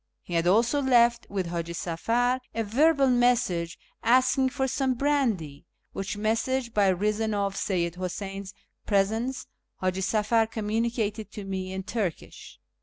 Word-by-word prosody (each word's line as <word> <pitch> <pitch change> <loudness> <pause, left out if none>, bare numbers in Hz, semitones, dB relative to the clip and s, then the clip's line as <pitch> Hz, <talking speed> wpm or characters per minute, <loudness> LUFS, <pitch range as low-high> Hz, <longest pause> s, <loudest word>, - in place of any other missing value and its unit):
He 175 - -8
had 165 0 +1
also 235 +9 +3
left 240 -3 +3
with 195 -2 -2
Haji 170 0 -4
Safar 230 +10 0 0.2
a 225 - 0
verbal 275 +6 +3
message 240 -9 +2 0.2
asking 255 +2 +3
for 265 0 -1
some 265 0 0
brandy, 235 - 0 0.3
which 195 +1 -4
message, 235 +3 -1
by 205 -2 +3
reason 210 +3 0
of 200 -1 -1
Seyyid 175 -4 -1
Huseyn's 195 +1 -5 0.3
presence, 220 +6 0 0.3
Haji 185 0 -1
Safar 220 +3 +2
communicated 220 0 -2
to 210 - -6
me 190 -1 -4
in 190 0 -4
Turkish. 195 -5 -5
215 Hz, 135 wpm, -27 LUFS, 190-245 Hz, 0.3 s, also